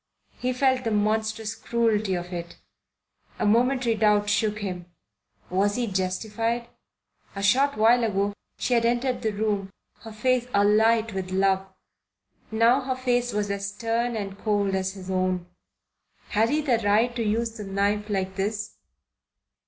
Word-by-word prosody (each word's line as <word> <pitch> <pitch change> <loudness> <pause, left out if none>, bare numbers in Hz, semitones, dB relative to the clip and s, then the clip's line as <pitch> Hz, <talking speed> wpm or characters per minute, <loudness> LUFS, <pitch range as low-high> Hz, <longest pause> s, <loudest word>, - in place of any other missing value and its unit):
He 255 - 0
felt 260 0 +2
the 230 - 0
monstrous 215 +1 0
cruelty 225 -3 0
of 175 +1 -5
it. 170 -1 -6 0.8
A - - -1
momentary 245 +2 +3
doubt 210 -1 +2
shook 210 0 +1
him. 180 -4 -5 0.6
Was 200 +2 +2
he 245 - 0
justified? 220 +4 -2 0.7
A 195 - -4
short 270 +7 +3
while 230 +3 +5
ago 200 -2 0 0.2
she 250 - -1
had 235 -1 +3
entered 245 +2 0
the 220 - 0
room 205 -2 -1 0.3
her 225 - -10
face 245 +3 0
alight 220 +2 +3
with 190 -1 -4
love; 190 0 +1 0.8
now 230 +4 +3
her 260 0 -2
face 245 -1 0
was 205 -1 -1
as 200 0 -2
stern 230 +2 -1
and 200 -2 -5
cold 205 -2 0
as 190 0 -1
his 190 -1 -8
own. 185 -1 0 0.8
Had 220 +2 +2
he 300 +3 +1
the 255 -6 +1
right 220 +4 +2
to 240 - -2
use 225 +1 0
the 220 -2 -8
knife 200 +2 -1
like 190 -2 -2
this? 210 +2 -3
215 Hz, 155 wpm, -25 LUFS, 200-235 Hz, 0.8 s, while